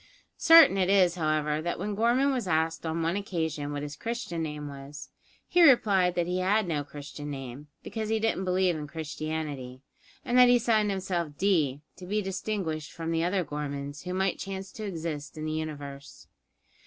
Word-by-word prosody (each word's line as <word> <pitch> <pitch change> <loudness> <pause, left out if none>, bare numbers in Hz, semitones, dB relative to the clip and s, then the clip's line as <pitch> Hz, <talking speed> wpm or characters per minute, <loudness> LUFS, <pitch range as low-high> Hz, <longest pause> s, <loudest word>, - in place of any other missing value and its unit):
Certain 325 -12 +8
it 185 -1 +2
is, 185 -3 +5
however, 155 -2 0
that 175 +2 -2
when 205 +4 -3
Gorman 240 +6 +2
was 245 -7 -2
asked 160 0 0
on 165 +1 -1
one 165 +3 0
occasion 160 -8 -3
what 145 0 -4
his 145 0 -6
Christian 230 - -4
name 150 -2 -4
was, 140 0 -9 0.4
he 355 - +3
replied 200 - +5
that 175 - +1
he 180 +1 -1
had 200 +2 +2
no 150 -4 -1
Christian 145 0 -8
name; 135 0 -7 0.2
because 220 -1 -4
he 220 0 +1
didn't 220 -3 0
believe 185 -1 +2
in 150 -1 -5
Christianity, 150 -3 -5 0.4
and 245 +1 +3
that 250 -1 +8
he 245 - +6
signed 220 -3 +2
himself 180 -6 -2
"D," 155 -8 +1 0.2
to 180 0 -10
be 210 +3 0
distinguished 190 -5 -3
from 165 -1 -4
the 165 0 +1
other 180 0 0
Gormans 145 -1 -5
who 180 0 -3
might 190 -1 0
chance 195 0 -6
to 215 - -7
exist 160 -5 -5
in 155 - -4
the 155 - -2
universe. 145 -3 -6
170 Hz, 185 wpm, -28 LUFS, 150-195 Hz, 0.4 s, Certain